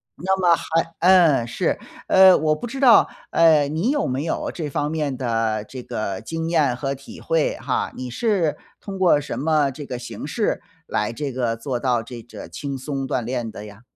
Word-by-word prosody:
那 190 +3 -1
么 175 -2 +5
还 165 +1 -1
嗯， 170 -9 +5
是。 115 - -1 0.3
呃， 190 -1 +7
我 155 0 +1
不 240 - -6
知 265 +3 -6
道， 255 -4 +6 0.2
呃， 155 -4 +5
你 160 - -1
有 290 0 +1
没 130 +3 -2
有 165 - -2
这 155 -4 -4
方 145 +2 -2
面 150 -5 -2
的 115 -4 -1
这 130 +3 -9
个 100 -5 -4
经 165 0 -4
验 145 -7 +2
和 135 +1 -2
体 135 0 -11
会 165 -2 0
哈， - - -2
你 125 -1 -5
是 180 - +1 0.2
通 195 -2 -7
过 175 -5 +5
什 140 - -5
么 150 -2 +2
这 145 +2 -9
个 125 - -4
形 125 - -7
式 - - -1 0.2
来 105 +2 -1
这 140 +1 -4
个 120 -3 -1
做 125 +1 -3
到 120 -3 0
这 120 0 -9
个 120 - -10
轻 140 -2 -5
松 135 0 -4
锻 120 - -1
炼 120 -2 -3
的 105 - -9
呀？ 105 +1 -13
145 Hz, 215 characters per minute, -22 LUFS, 125-165 Hz, 0.3 s, 呃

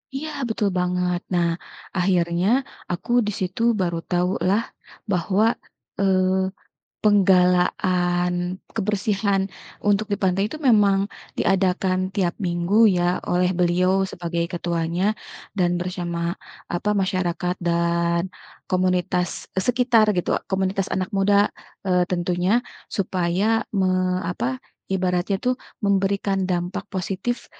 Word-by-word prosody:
Iya, 310 +3 -3 0.2
betul 215 -2 0
banget. 180 0 0
Nah, 170 -1 +3 0.5
akhirnya 175 0 +1 0.4
aku 175 +7 -4 0.2
di - - 0
situ 185 +4 -3 0.2
baru 170 -2 0
tahu 180 +1 +1 0.2
lah 205 +4 +3 0.5
bahwa, 190 +3 +2 0.6
eee, 185 -1 +3 0.8
penggalaan 180 -2 +3 0.4
kebersihan 200 -1 +1 0.5
untuk 205 +1 +2
di - - +2
pantai 190 0 +2
itu - - -5
memang 205 -4 +5 0.4
diadakan 185 -1 +2 0.2
tiap 180 -4 +1
minggu 175 +4 0 0.2
ya 175 - +1 0.3
oleh 180 0 +3
beliau 185 +2 +2
sebagai 170 -2 -3
ketuanya 175 +4 -1 0.4
dan 175 -2 +2
bersama 175 -1 -3 0.3
apa 180 +4 -1
masyarakat 185 -3 0
dan 170 +1 +1 0.4
komunitas, 180 -1 0
eee, 190 - 0
sekitar 245 -2 +4
gitu 180 - 0 0.2
komunitas 190 0 0
anak 185 -1 -1
muda, 200 +1 +4 0.4
eee, 180 -1 +3
tentunya, 180 +5 +1 0.3
supaya 190 +3 +1
me 185 -2 +1
apa 130 -8 -3 0.3
ibaratnya 185 +1 0
tuh 250 +4 +1 0.3
memberikan 195 0 +1
dampak 180 +2 -1
positif, 195 +6 -3
185 Hz, 110 wpm, -23 LUFS, 175-195 Hz, 0.8 s, memang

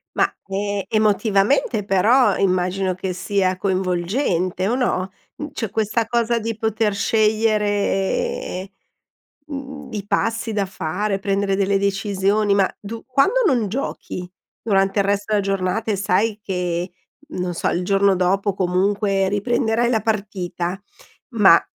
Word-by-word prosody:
Ma, - - +2 0.2
ehm, 200 0 -2
emotivamente 215 +2 +2
però 215 +7 +4
immagino 185 0 +1
che 185 0 -3
sia 185 0 0
coinvolgente 185 - 0
o 235 - +1
no? 190 -7 0 0.2
Mhmm, 300 0 -6
cioè 225 - -3
questa 220 +2 0
cosa 235 0 +1
di 225 0 -3
poter 220 -1 0
scegliere, 210 - 0 0.8
mhmm, 275 -1 -7
i 205 -2 -4
passi 225 +2 0
da 205 -2 0
fare, 195 +2 -2
prendere 195 0 0
delle 195 0 +2
decisioni, 200 +1 +1
ma 195 -2 +3
du 225 +3 -8
quando 375 - +2
non 240 - +2
giochi 185 -6 -5 0.3
durante 195 -2 +1
il 195 - +2
resto 205 +1 0
della 205 - +3
giornata 195 +3 -1
e - - +1
sai 200 +3 +1
che 180 -2 -2 0.4
non 180 - -3
so - - -2
il 175 - -1
giorno 195 +1 +3
dopo 195 +3 +1
comunque 195 +2 +1
riprenderai 230 +3 +1
la 225 -3 +1
partita, 195 -3 -3 0.5
ma 200 -7 +6
200 Hz, 130 wpm, -21 LUFS, 190-220 Hz, 0.8 s, ma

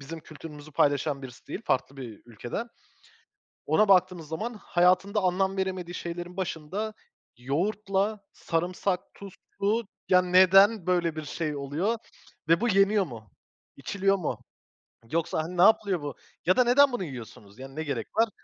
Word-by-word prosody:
bizim 160 +4 -8
kültürümüzü 155 -1 -11
paylaşan 145 0 +1
birisi 125 -2 -11
değil 220 - -6
farklı 135 +1 -1
bir 120 -6 -9
ülkeden. 120 - -6 1.0
Ona 215 - +3
baktığımız 180 -4 +3
zaman 215 +10 -4
hayatında 185 0 +2
anlam 190 +1 +1
veremediği 185 -2 -3
şeylerin 175 +1 -6
başında 190 +4 -3 0.4
yoğurtla, 195 - -1
sarımsak, 180 +2 -1
tuzlu, 200 +2 -3 0.2
ya, 180 -1 +6
neden 185 +2 +5
böyle 175 -3 +1
bir 155 -1 -5
şey 150 0 -3
oluyor 150 +11 -1 0.5
ve 165 +4 +4
bu 240 - +2
yeniyor 195 0 +4
mu, 110 - -11 0.5
içiliyor 195 +7 +1
mu, 180 - -3 0.7
yoksa, 160 -1 0
hani, 180 +3 -7
ne - - +4
yapılıyor 200 -4 +4
bu 145 -1 -5 0.3
ya 185 - +3
da 250 - +6
neden 265 +3 +5
bunu 245 -6 -2
yiyorsunuz, 115 - -10
yani, 135 +1 -10
ne 155 - -3
gerek 140 -7 -3
var? 225 0 +3
180 Hz, 145 wpm, -27 LUFS, 150-195 Hz, 1.0 s, ya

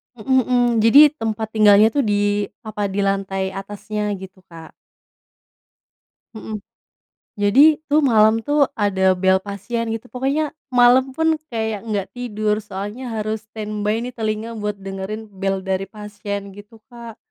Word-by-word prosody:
Mhm 260 +4 +1
mhm. 245 -1 +3 0.2
Jadi 275 +7 +7
tempat 225 -6 -4
tinggalnya 215 0 +5
tuh 290 - -1
di 205 -3 +1 0.2
apa, 210 -2 -3
di 200 +1 -2
lantai 195 -1 -1
atasnya 205 +1 -4
gitu, 190 0 -11
Kak. 165 -2 -12 1.6
Mhm. 220 -1 -6 0.8
Jadi 280 +10 +5
tuh 295 +1 +3
malam 220 -2 +4
tuh 290 -1 +2
ada 190 -3 +2
bel 190 +1 +3
pasien 205 +4 -4
gitu. 225 +2 -4
Pokoknya 275 +4 -1 0.2
malam 255 +1 +4
pun 320 -1 +1
kayak 220 -4 -3
nggak 200 -3 -1
tidur. 215 -4 -2
Soalnya 210 +5 -6
harus 220 -1 -3
stand 215 -1 -6
by 215 +3 0
nih 250 - -6
telinga 220 0 -3
buat 210 0 -3
dengerin 195 +2 -7
bel 195 -1 -1
dari 190 0 -2
pasien 205 -1 -7
gitu, 205 +3 -14 0.2
Kak. 235 -2 -10
215 Hz, 140 wpm, -20 LUFS, 200-235 Hz, 1.6 s, Jadi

